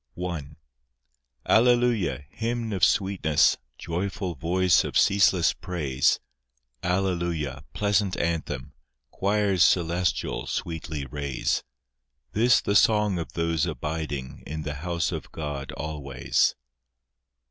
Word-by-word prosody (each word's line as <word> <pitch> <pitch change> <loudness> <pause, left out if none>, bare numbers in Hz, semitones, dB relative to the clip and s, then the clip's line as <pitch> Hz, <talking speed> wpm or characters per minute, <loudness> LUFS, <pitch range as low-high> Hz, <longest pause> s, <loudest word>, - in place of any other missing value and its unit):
I 90 -2 -3 1.1
Alleluia, 120 - +3
hymn 115 -1 -2
of 95 - -3
sweetness, 95 -6 +3 0.2
Joyful 90 +2 -3
voice 85 +2 +2
of - - -1
ceaseless 95 -4 +4
praise; 70 -7 0 0.6
Alleluia, 85 -6 -1
pleasant 100 -2 +1
anthem, 75 -5 -2 0.4
Choirs 100 -2 +2
celestial 85 0 +1
sweetly 80 -3 -4
raise: 70 -1 -2 0.7
This 120 +3 +4
the 100 - -1
song 105 -3 +4
of 85 - -6
those 85 -2 0
abiding 75 -4 -4
In 75 +1 -4
the 75 - -3
house 85 -2 -1
of - - -6
God 75 -3 -5
always. 70 -5 0
85 Hz, 100 wpm, -26 LUFS, 75-100 Hz, 1.1 s, ceaseless